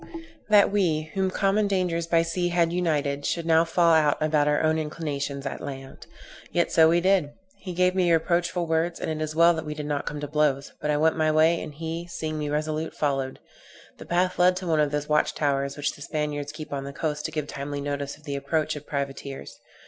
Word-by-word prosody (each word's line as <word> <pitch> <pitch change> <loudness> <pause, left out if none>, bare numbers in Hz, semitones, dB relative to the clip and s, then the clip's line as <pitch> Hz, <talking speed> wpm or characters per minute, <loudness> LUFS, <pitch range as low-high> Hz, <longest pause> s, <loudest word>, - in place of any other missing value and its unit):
That 205 -2 +6
we, 160 -6 0
whom 190 -1 +1
common 200 +2 +1
dangers 180 -4 0
by 165 0 +3
sea 175 +2 -1
had 170 -1 +1
united, 150 -5 0
should 170 +2 -1
now 165 0 +5
fall 170 0 +3
out 150 -2 +4
about 150 -1 +2
our 150 +1 +2
own 160 0 +2
inclinations 145 -3 -4
at 140 - -4
land. 135 -1 -8 0.4
Yet 175 - +1
so 160 0 +6
we 170 +1 +3
did. 185 -6 +2 0.3
He 185 - -7
gave 180 +1 +3
me 180 -2 +2
reproachful 170 +2 +1
words; 165 +1 0
and - - -3
it 155 0 -2
is 155 0 -5
well 170 +1 +6
that 160 -1 -4
we 150 -1 -5
did 150 -1 -5
not 145 -1 -2
come 150 - -4
to 145 - -4
blows, 145 -2 0
but 150 - -2
I 150 - +2
went 160 +2 +2
my 155 -1 +2
way, 160 +2 +3
and - - -6
he, 165 +2 -5
seeing 155 -2 -4
me 150 -1 -2
resolute, 155 +1 -2
followed. 135 -3 -1 0.6
The - - -10
path 180 +1 0
led 180 +1 +5
to 185 0 -5
one 160 -2 +2
of 150 -1 +3
those 150 0 -2
watchtowers 140 -2 0
which 145 - -1
the - - -14
Spaniards 145 -1 -3
keep 155 -1 -8
on 140 -1 -3
the 140 - -7
coast 150 0 -3
to 155 - -3
give 150 -2 -2
timely 145 0 -5
notice 140 0 -4
of 155 - -22
the 145 -2 -4
approach 155 +2 -1
of 150 0 -9
privateers. 140 -1 -5
155 Hz, 225 wpm, -25 LUFS, 145-170 Hz, 0.6 s, That